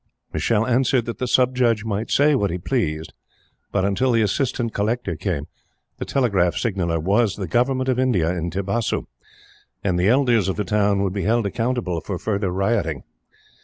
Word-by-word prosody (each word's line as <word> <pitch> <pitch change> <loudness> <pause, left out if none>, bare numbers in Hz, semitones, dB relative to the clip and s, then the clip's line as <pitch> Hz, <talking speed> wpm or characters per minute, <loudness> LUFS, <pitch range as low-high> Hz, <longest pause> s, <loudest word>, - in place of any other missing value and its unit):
Michele 110 -1 +1
answered 125 0 +2
that 115 - -5
the 125 - -1
Sub 125 +1 +2
Judge 115 -4 +2
might 110 +1 -2
say 150 +2 +4
what 105 -8 +1
he 90 - -2
pleased, 85 - -2 0.6
but, 95 -2 +1
until 125 +6 +1
the 115 -1 +3
Assistant 120 +1 -1
Collector 105 -3 -1
came, 70 -1 -3 0.5
the - - -3
Telegraph 100 -10 +1
Signaller 90 -7 -1
was 100 +5 +2
the 100 - -4
Government 130 +6 +1
of 130 -1 +1
India 90 -10 +1
in 85 0 -2
Tibasu, 100 +6 -2 0.8
and 90 -3 0
the 90 +3 +3
elders 120 -5 +3
of 95 - -1
the 105 - -1
town 100 0 +2
would 95 -2 -1
be 100 - -2
held 115 +1 +2
accountable 115 -5 -1
for 90 +3 -4
further 100 0 -1
rioting. 95 -5 -1
105 Hz, 175 wpm, -22 LUFS, 95-120 Hz, 0.8 s, say